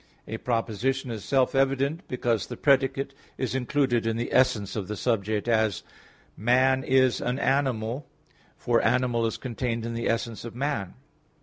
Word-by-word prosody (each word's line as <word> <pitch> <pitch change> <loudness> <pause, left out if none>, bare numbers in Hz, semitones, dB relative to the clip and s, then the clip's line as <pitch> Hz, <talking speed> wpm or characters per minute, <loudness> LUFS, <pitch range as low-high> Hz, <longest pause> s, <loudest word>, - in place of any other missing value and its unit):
A 110 - -4
proposition 120 +3 -1
is 110 -3 -5
self 135 -2 +2
evident 135 +5 +1
because 115 -5 -1
the - - -7
predicate 135 0 +2 0.2
is 130 - -2
included 130 -2 +1
in 115 0 0
the 120 - -3
essence 125 -6 +2
of 100 -4 -3
the 105 - -4
subject, 110 -2 0
as 110 -4 +1 0.5
"Man 130 +5 +3
is 130 -1 +3
an 125 +1 -1
animal," 130 -2 0 0.5
for 120 -1 +1
animal 120 -1 +2
is 115 - -3
contained 120 -2 -3
in 115 - -3
the 115 0 -2
essence 115 -1 -2
of 115 -1 -8
man. 125 -8 -2
120 Hz, 160 wpm, -26 LUFS, 115-130 Hz, 0.5 s, Man